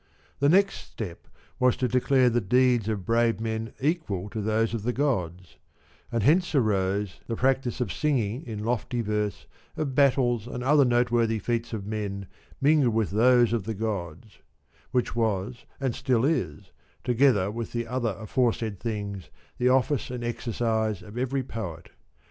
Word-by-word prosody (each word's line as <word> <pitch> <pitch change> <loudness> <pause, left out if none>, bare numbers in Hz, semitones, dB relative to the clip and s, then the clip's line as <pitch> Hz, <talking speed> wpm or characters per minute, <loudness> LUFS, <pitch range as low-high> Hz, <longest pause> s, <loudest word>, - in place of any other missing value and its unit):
The 140 +1 +4
next 195 +4 +4
step 95 -7 -8 0.3
was 125 -1 +3
to 125 - +1
declare 125 +1 +3
the 120 +1 +1
deeds 120 +1 +3
of 100 -4 -3
brave 115 -1 +2
men 110 0 -3
equal 130 - -1
to 110 - -3
those 110 +2 +1
of 115 - -2
the 120 +4 -1
gods; 90 - -2 0.5
and 115 -3 0
hence 165 - +3
arose 100 -5 +1
the 115 - -2
practice 130 0 0
of 120 -8 -1
singing 130 -5 0
in 105 -2 -5
lofty 120 +1 -1
verse 105 -2 -2 0.3
of 140 -4 -2
battles 125 -4 +2
and 125 0 -5
other 145 +1 +5
noteworthy 120 -2 +2
feats 115 +2 -2
of 105 -4 -4
men 100 -2 -4 0.3
mingled 140 -5 +3
with 110 -4 +1
those 120 +2 +4
of 110 -5 -1
the 110 0 -3
gods; 105 -1 -5 0.5
which 125 -2 -1
was 115 +1 -1
and 135 -3 -1
still 125 -1 +1
is, 160 +2 -1 0.3
together 120 -6 +3
with 115 +1 -5
the 120 0 -2
other 115 -4 -2
aforesaid 110 -2 -1
things, 100 - -4 0.3
the 125 +1 +3
office 130 +2 +2
and 125 -1 -5
exercise 110 -3 -1
of 105 +1 -12
every 130 +2 -1
poet. 90 -10 -7
115 Hz, 160 wpm, -26 LUFS, 105-125 Hz, 0.5 s, other